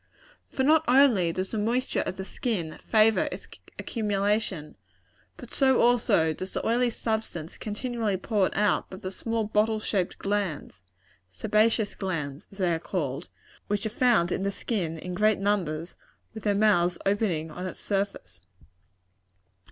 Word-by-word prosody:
For 265 - -2
not 310 +3 +5
only 245 -10 +5
does 185 +3 -3
the 220 - -1
moisture 240 +5 0
of 185 - -4
the 190 - -5
skin 190 -9 -3
favor 220 0 +3
its - - -7 0.3
accumulation, 205 - -1 0.6
but 245 - -11
so 265 -2 +3
also 225 -9 +3
does 185 +4 -6
the - - -2
oily 240 +2 +2
substance 220 -8 -3
continually 220 -2 -2
poured 195 0 0
out 205 -2 +1
by 190 - -8
the 185 -1 -6
small 225 +3 -1
bottle 215 +1 +1
shaped 195 -4 -1
glands 195 - -3 0.5
sebaceous 215 - +1
glands, 155 -7 -4
as 195 - -15
they 180 -3 +1
are 165 - -1
called 155 -4 -3 0.4
which 205 0 -1
are - - 0
found 215 -7 +3
in - - -1
the 200 - 0
skin 190 -5 -3
in 180 +3 -6
great 215 +3 +3
numbers, 180 -5 -1 0.4
with 220 -1 -9
their 205 -1 +2
mouths 180 -4 +3
opening 195 -6 0
on 180 +4 -5
its - - -7
surface. 200 0 -3
205 Hz, 150 wpm, -27 LUFS, 180-220 Hz, 0.6 s, not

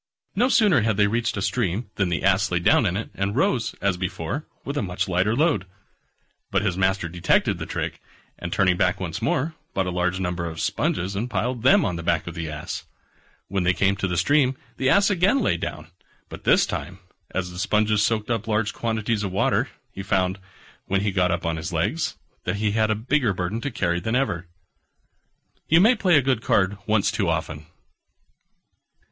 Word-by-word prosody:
No 245 +6 +3
sooner 205 - +4
had 110 -2 +1
they 105 - +5
reached 115 +2 0
a 100 - -1
stream 100 +2 -1
than 95 -3 0
the 85 - -1
Ass 95 0 +3
lay 90 - +1
down 90 +5 +4
in 90 +1 -1
it, 110 - -5
and 100 +2 -2
rose, 130 -2 +1
as 100 -2 +1
before, 95 - -4 0.2
with 140 - -4
a 145 - 0
much 90 -3 -2
lighter 95 +4 +1
load. 135 - +1 0.8
But - - +1
his 95 -5 0
master 95 -1 +1
detected 85 0 +1
the - - -5
trick, - - -4 0.4
and 85 - -5
turning 90 -2 +2
back 90 +1 +1
once 90 0 -4
more, 130 +7 0 0.2
bought 95 - +1
a 90 - -2
large 90 +1 0
number 90 -2 -2
of 80 0 -6
sponges, 90 +2 -1
and 115 +5 -2
piled 125 0 -2
them 130 - +5
on 90 -4 -1
the - - -5
back 85 -1 0
of 85 - -6
the 80 -2 -5
Ass. 75 0 -6 0.6
When 95 0 -1
they 90 0 +2
came 100 0 +2
to 95 - -1
the 90 -1 -2
stream 130 - +3 0.2
the 130 - +1
Ass 200 +7 +4
again 195 +8 +3
lay 225 - +1
down: 85 - -6 0.4
but - - -10
this - - +5
time, 85 +6 -5 0.3
as 90 -1 -3
the 90 - -8
sponges 105 +1 +2
soaked 110 +1 0
up 115 -1 -1
large 105 -1 0
quantities 110 -1 -1
of 100 - -2
water, 95 - +1 0.2
he 95 - -7
found, 95 -1 0 0.5
when 95 0 +1
he 105 0 0
got 90 -2 +2
up 85 -1 -1
on 85 -1 -1
his 80 +3 -5
legs, 85 - -1 0.3
that - - -1
he 105 0 0
had 110 0 +1
a 110 - +2
bigger 120 0 +1
burden 95 +6 -2
to 145 - -2
carry 90 -8 -1
than 110 +7 -2
ever. 95 -10 -1 1.2
You 165 - +5
may 220 +7 +6
play 185 -8 +3
a 140 - +3
good 130 -4 +1
card 100 -1 +1
once 105 -1 +2
too 105 -4 0
often. 80 -2 -3
100 Hz, 205 wpm, -24 LUFS, 90-115 Hz, 1.2 s, may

